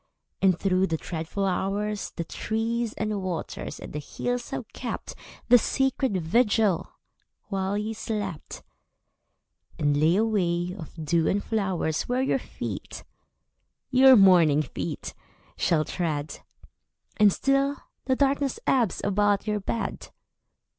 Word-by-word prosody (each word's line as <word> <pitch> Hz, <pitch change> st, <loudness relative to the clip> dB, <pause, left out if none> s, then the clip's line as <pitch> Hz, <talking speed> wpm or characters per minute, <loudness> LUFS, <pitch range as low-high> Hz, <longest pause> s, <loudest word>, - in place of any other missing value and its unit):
And 185 Hz, -3 st, +4 dB
through 190 Hz, 0 st, +2 dB
the 165 Hz, -, -1 dB
dreadful 165 Hz, +5 st, -3 dB
hours 200 Hz, +2 st, -1 dB
The 170 Hz, -, -2 dB
trees 225 Hz, +5 st, -2 dB
and 215 Hz, -2 st, -2 dB
waters 180 Hz, -3 st, -4 dB
and -, -, -9 dB
the 150 Hz, -, -3 dB
hills 245 Hz, -, -3 dB
have -, -, -5 dB
kept -, -, -5 dB, 0.4 s
The 245 Hz, 0 st, +8 dB
sacred 265 Hz, -4 st, 0 dB
vigil 205 Hz, +1 st, +2 dB, 0.6 s
while 195 Hz, 0 st, -1 dB
you 215 Hz, +2 st, -2 dB
slept, 205 Hz, -7 st, -5 dB, 1.1 s
And 145 Hz, -3 st, +2 dB
lay 155 Hz, +4 st, +3 dB
a 215 Hz, +3 st, +3 dB
way 180 Hz, -4 st, 0 dB
of 165 Hz, -7 st, -10 dB
dew 165 Hz, +1 st, +2 dB
and 200 Hz, +1 st, +1 dB
flowers 190 Hz, -7 st, -1 dB
Where 250 Hz, +1 st, +1 dB
your 270 Hz, -, +1 dB
feet, -, -, -7 dB, 0.9 s
your 260 Hz, 0 st, +8 dB
morning 175 Hz, -8 st, +6 dB
feet, -, -, -5 dB, 0.4 s
shall 155 Hz, -3 st, +1 dB
tread. 155 Hz, -4 st, -3 dB, 0.8 s
And 210 Hz, -2 st, +6 dB
still 275 Hz, +5 st, +1 dB, 0.3 s
the 260 Hz, -, +2 dB
darkness 275 Hz, 0 st, +1 dB
ebbs 235 Hz, -9 st, +2 dB
about 205 Hz, 0 st, +2 dB
your 210 Hz, -1 st, 0 dB
bed. 225 Hz, +3 st, -4 dB
200 Hz, 125 wpm, -26 LUFS, 175-230 Hz, 1.1 s, The